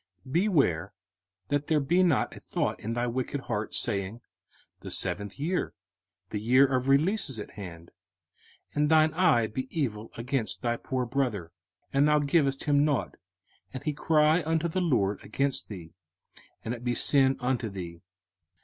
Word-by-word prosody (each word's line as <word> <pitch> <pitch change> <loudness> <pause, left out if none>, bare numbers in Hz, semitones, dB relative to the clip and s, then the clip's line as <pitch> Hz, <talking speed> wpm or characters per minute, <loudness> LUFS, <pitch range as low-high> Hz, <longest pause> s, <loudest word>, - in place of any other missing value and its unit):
05:015:009 130 - -9
Beware 160 - +2 0.6
that 145 0 0
there 155 -2 +3
be 170 +6 +2
not 170 -8 +2
a - - -10
thought - - -2
in 115 +2 -4
thy 120 +1 0
wicked 130 +3 -2
heart, 105 -4 -3
saying, 100 +3 -1 0.6
The - - -8
seventh 100 -1 -2
year, 170 +6 -2 0.6
the 105 - -2
year 130 +5 +5
of 130 -1 0
release, 160 +7 +3
is 125 -5 -5
at 105 - -7
hand; 85 -5 -10 0.8
and 150 0 +1
thine 155 0 +5
eye 160 -9 +4
be 130 +4 -4
evil 115 -9 -3
against 125 0 -2
thy 120 -1 0
poor 130 0 -2
brother, 120 -10 -2 0.4
and 140 +2 +4
thou 150 0 +4
givest 140 -2 +1
him 145 -1 +3
nought; 145 -3 0 0.6
and 130 - -5
he 150 - -1
cry 155 +2 +3
unto 160 +1 0
the 185 +3 -1
LORD 105 - +1
against 135 +6 -2
thee, 85 -6 -9 0.7
and 115 - -2
it 120 -1 -8
be 120 0 0
sin 135 0 +4
unto 125 -2 -1
thee. 85 -4 -7
130 Hz, 165 wpm, -28 LUFS, 110-150 Hz, 0.8 s, year